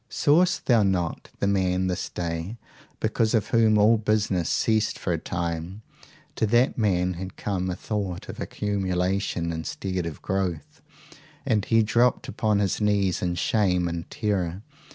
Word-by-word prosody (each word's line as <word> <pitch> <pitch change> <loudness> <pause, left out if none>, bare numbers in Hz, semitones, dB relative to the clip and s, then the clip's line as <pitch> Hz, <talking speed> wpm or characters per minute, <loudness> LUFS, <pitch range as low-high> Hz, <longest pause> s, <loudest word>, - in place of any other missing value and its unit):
Sawest 175 +5 +2
thou 120 -4 +4
not 90 -4 -1
the - - -1
man 95 -2 +1
this 90 0 -2
day 85 +5 -4 0.4
because 110 +1 +1
of 110 - 0
whom 110 -2 +4
all 110 +2 +5
business 105 -5 0
ceased 110 -1 +1
for 90 - -2
a 85 - -1
time? 85 +5 -4 0.5
to 110 - +1
that 120 +4 +3
man 90 -5 +1
had 95 +2 -7
come 95 -2 -2
a 90 - -2
thought 100 -5 -4
of - - -8
accumulation 95 -3 -1
instead 90 +2 -3
of 80 - -8
growth, 95 -5 -3 0.6
and 105 -2 +1
he 115 -1 +4
dropped 120 +5 +2
upon 110 -5 0
his 100 0 0
knees 100 -4 +1
in 90 -1 -1
shame 90 -2 +1
and 85 0 -5
terror. 95 -3 -2
95 Hz, 155 wpm, -25 LUFS, 90-110 Hz, 0.6 s, all